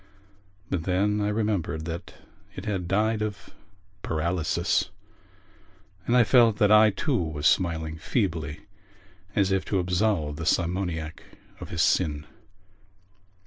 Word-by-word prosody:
But 85 -4 -1
then 100 +3 +1
I 105 - 0
remembered 105 -7 -1
that 85 +1 -6 0.4
it 95 - -7
had 95 -5 -2
died 105 +3 +1
of 105 -3 -5 0.5
paralysis 85 +2 0 1.2
and 120 - +3
I 125 - +7
felt 115 -2 +4
that 105 0 +3
I 110 0 +7
too 135 +7 -1
was 80 -2 -4
smiling 80 -2 +1
feebly 80 - -2 0.7
as 100 -2 +2
if 95 -1 +1
to 100 - -1
absolve 90 -4 0
the 80 - -5
simoniac 85 -3 -1 0.4
of - - -8
his 85 -3 0
sin. 75 -4 +1
90 Hz, 125 wpm, -26 LUFS, 80-105 Hz, 1.2 s, I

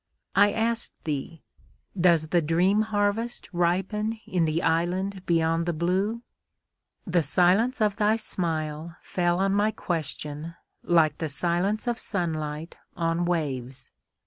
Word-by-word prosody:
I 205 +1 +6
asked 230 +1 -1
thee, 155 +2 -4 0.5
"Does 170 -4 +3
the 175 0 +3
dream 180 +7 +2
harvest 210 +3 -1
ripen 195 +6 0
in 175 -3 +1
the 160 +1 0
island 180 +4 0
beyond 165 0 +1
the 175 - +1
blue?" 190 +8 0 0.8
The 175 -2 +2
silence 185 - +2
of 210 -2 +2
thy 215 +1 +3
smile 160 -5 -3
fell 175 -1 0
on 195 +1 +1
my 205 +2 +3
question 160 -4 -4 0.3
like 160 -4 +3
the 160 - -2
silence 175 - +1
of 240 -1 -1
sunlight 160 -4 -3 0.2
on 165 0 0
waves. 135 -6 -3
175 Hz, 125 wpm, -26 LUFS, 160-200 Hz, 0.8 s, I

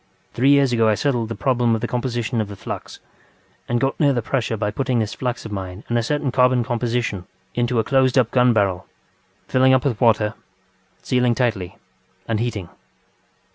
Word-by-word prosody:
Three 130 +3 +2
years 140 -3 +4
ago 115 -2 +3
I 105 - +3
settled 120 -3 -1
the 115 - -4
problem 120 -4 +1
of 110 - -4
the 120 - -1
composition 120 -1 -2
of 105 - -3
the 100 - -8
flux, 95 - -7 0.7
and 120 0 +1
got 135 +2 -1
near 145 -2 +4
the 120 -3 -1
pressure 115 -1 -1
by 105 -1 -1
putting 130 +2 -1
this 110 -2 -1
flux 125 -2 -4
of 110 - -7
mine 95 0 -6
and 120 - 0
a 120 - +3
certain 145 +3 -1
carbon 125 -1 +3
composition 120 -5 -2 0.3
into 120 0 0
a 110 - +3
closed 130 0 +2
up 125 -3 +3
gun 125 -1 +4
barrel, 100 -5 0 0.6
filling 130 0 +4
up 130 - 0
with 125 -5 -1
water, 110 -2 +3 0.7
sealing 125 -2 +1
tightly, 110 -8 -1 0.5
and 115 -2 -1
heating. 105 -7 -3
120 Hz, 190 wpm, -21 LUFS, 110-130 Hz, 0.7 s, years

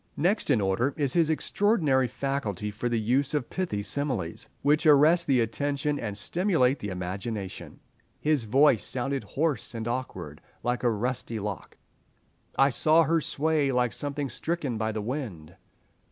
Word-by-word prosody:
Next 180 +6 +1
in 125 -7 +3
order 100 +8 0
is 140 -3 0
his 165 -3 +3
extraordinary 160 - +2
faculty 110 -8 -3
for 110 +4 -3
the 120 -1 0
use 130 +7 +1
of 140 -5 -2
pithy 170 - -2
similes, 120 - -2
which 150 +3 +3
arrest 155 +4 +6
the 130 -4 +4
attention 145 +5 -1
and 105 -3 -4
stimulate 155 - +2
the 105 - -5
imagination. 95 +2 -5 0.4
"His 150 -6 +1
voice 130 +1 +4
sounded 135 +2 -2
hoarse 145 -6 -2
and 115 0 -4
awkward, 95 - -5 0.2
like 120 0 -1
a 120 - +3
rusty 115 +1 -2
lock." 105 -2 -6 0.8
"I 135 +1 +5
saw 160 +5 +4
her 165 +1 +2
sway, 150 -1 +1
like 125 -3 +1
something 145 +2 -3
stricken 155 -3 -3
by 110 0 0
the 110 -1 -4
wind." 105 - -5
130 Hz, 155 wpm, -27 LUFS, 110-150 Hz, 0.8 s, arrest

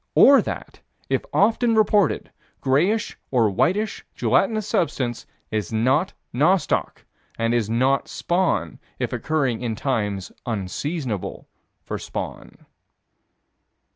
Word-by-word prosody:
Or 275 0 +8
that, - - -6 0.3
if - - +1
often 230 +2 +3
reported, 210 -2 +2 0.3
grayish 175 +12 +1
or 115 -5 +3
whitish 200 - 0
gelatinous 215 -2 +2
substance 140 - -1 0.2
is 105 -4 -2
not 130 - +2 0.2
nostoc, 165 +9 +1 0.3
and 115 0 +1
is 115 -3 +1
not 130 +4 +2
spawn 175 0 0 0.2
if - - -2
occurring 135 -7 0
in 115 -3 -2
times 105 -7 -2 0.2
unseasonable 115 - -3 0.4
for - - -4
spawn. - - -7
135 Hz, 105 wpm, -23 LUFS, 115-190 Hz, 0.4 s, Or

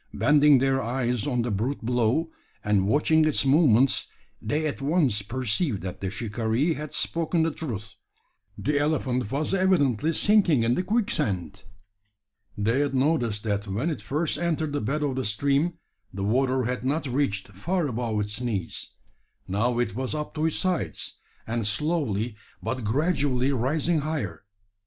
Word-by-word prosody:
Bending 150 -1 +5
their 135 +1 +2
eyes 120 0 -1
on 125 -4 0
the 120 - -2
brute 115 +5 -2
below, 125 +7 +1 0.3
and 100 -2 +2
watching 155 +6 +3
its 155 -3 +1
movements, 135 -3 +4 0.3
they 155 +1 -1
at 145 -2 -3
once 140 - +2
perceived 120 - -1
that 90 -2 -6
the 95 - -2
shikaree 115 - -1
had 150 -1 -6
spoken 165 0 0
the 165 - +1
truth. 115 -8 -6 0.6
The 145 0 0
elephant 130 -6 0
was 145 +6 -1
evidently 160 - +2
sinking 185 - +4
in 115 +1 +2
the 180 - +1
quicksand! 100 - -1 0.9
They 115 +5 +1
had 145 -1 0
noticed 130 -7 +1
that 105 -1 -1
when 115 - -1
it 155 - -5
first 155 +4 -1
entered 160 -3 -1
the 145 - -1
bed 150 +8 -1
of 135 -3 -1
the 130 - 0
stream, 140 - +1 0.4
the 95 +1 -5
water 130 +4 +2
had 125 +2 -2
not 145 +5 0
reached 125 -8 -1
far 165 - -1
above 115 -4 -1
its 105 +3 -4
knees. 110 -8 -4 0.5
Now 115 +6 0
it 120 -5 0
was 130 +5 -3
up 150 0 -4
to 155 +1 0
its 160 - -1
sides, 185 -2 -2 0.3
and 115 -2 -2
slowly 120 - -1 0.2
but 130 -2 -3
gradually 140 +1 +1
rising 150 +6 +1
higher. 140 - -4
130 Hz, 155 wpm, -26 LUFS, 110-155 Hz, 0.9 s, Bending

